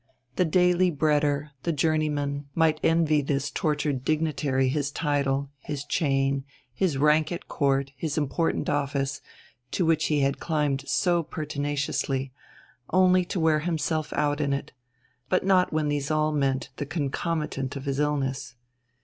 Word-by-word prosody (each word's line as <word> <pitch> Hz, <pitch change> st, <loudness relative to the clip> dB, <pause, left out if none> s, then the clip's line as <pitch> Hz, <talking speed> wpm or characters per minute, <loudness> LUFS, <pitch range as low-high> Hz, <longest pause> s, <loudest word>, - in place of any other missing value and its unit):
The 180 Hz, -, +2 dB
daily 180 Hz, +2 st, +3 dB
breader, 150 Hz, -1 st, +1 dB
the 170 Hz, -, 0 dB
journeyman, 145 Hz, -2 st, 0 dB
might 160 Hz, -2 st, +3 dB
envy 160 Hz, -2 st, +3 dB
this 140 Hz, 0 st, -1 dB
tortured 145 Hz, -4 st, -1 dB
dignitary 145 Hz, -3 st, +1 dB
his 140 Hz, +1 st, 0 dB
title, 140 Hz, -2 st, 0 dB
his 145 Hz, 0 st, -5 dB
chain, 135 Hz, -3 st, +1 dB, 0.3 s
his 160 Hz, 0 st, 0 dB
rank 150 Hz, +3 st, +3 dB
at 175 Hz, -, -5 dB
Court, 140 Hz, -2 st, 0 dB
his 150 Hz, +3 st, -3 dB
important 150 Hz, +2 st, 0 dB
office, 140 Hz, -1 st, -1 dB, 0.5 s
to 175 Hz, -, 0 dB
which 160 Hz, -1 st, +2 dB
he 150 Hz, -2 st, +1 dB
had 135 Hz, 0 st, +1 dB
climbed 145 Hz, -4 st, -1 dB
so 175 Hz, -2 st, +2 dB
pertinaciously, 145 Hz, -3 st, -2 dB, 0.6 s
only 185 Hz, 0 st, +4 dB
to 180 Hz, -, -3 dB
wear 160 Hz, -1 st, +3 dB
himself 155 Hz, -2 st, -1 dB
out 145 Hz, 0 st, 0 dB
in 140 Hz, -1 st, +1 dB
it: 140 Hz, -, -4 dB, 0.6 s
but 185 Hz, -, +1 dB
not 185 Hz, -2 st, +4 dB
when 155 Hz, -1 st, 0 dB
these 145 Hz, -1 st, -1 dB
all 155 Hz, 0 st, +2 dB
meant 135 Hz, -3 st, 0 dB
the 145 Hz, -, -4 dB
concomitant 150 Hz, -2 st, -2 dB
of 135 Hz, 0 st, -6 dB
his 140 Hz, 0 st, -1 dB
illness. 135 Hz, -4 st, -1 dB
145 Hz, 145 wpm, -26 LUFS, 140-160 Hz, 0.6 s, only